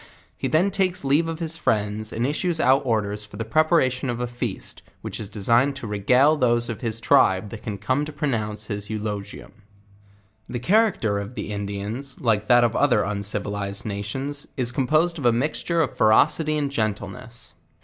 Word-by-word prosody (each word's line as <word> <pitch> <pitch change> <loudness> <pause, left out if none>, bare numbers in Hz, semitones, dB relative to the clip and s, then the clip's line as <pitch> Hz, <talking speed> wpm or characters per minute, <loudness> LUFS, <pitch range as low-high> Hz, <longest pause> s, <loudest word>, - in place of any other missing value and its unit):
He - - -3
then 180 +6 +2
takes 185 -3 0
leave 145 +5 +3
of 165 -1 -3
his 165 -1 -3
friends, 105 -3 -1
and 115 +2 -1
issues 160 +4 -1
out 135 -1 +4
orders 105 -4 -1
for 105 - -12
the 115 - -3
preparation 135 -2 +2
of 120 -1 -2
a 125 - -1
feast, 120 -3 -6 0.2
which - - -6
is 100 - -5
designed 115 +6 +2
to 135 - -7
regale 125 +8 +3
those 120 -4 +2
of 110 -4 -5
his 115 -1 -2
.tribe 100 -2 +3
.that 115 - -8
can 105 -2 -5
come 130 +8 0
to 155 - -7
pronounce 110 -8 -2
his 105 -1 -5
104 105 -2 -3
JOURNAL 100 +1 -11
OF - - -23 1.0
The 120 - -2
character 175 - +2
of 100 +4 -7
the 105 -2 -5
Indians, 100 +7 -5
like 110 -3 +1
that 120 0 +6
of 115 -2 +1
other 125 -8 +3
uncivili 100 -1 -3
zed - - -2
nations, 120 +8 -4
is 125 -2 +1
composed 155 +6 +1
ot' 140 - -5
a - - +6
mixture 155 +7 0
of 140 -5 -1
ferocity 150 +8 +3
and 145 -2 -1
gentle 110 -5 -1
ness. 120 +3 -10
120 Hz, 190 wpm, -24 LUFS, 105-145 Hz, 1.0 s, that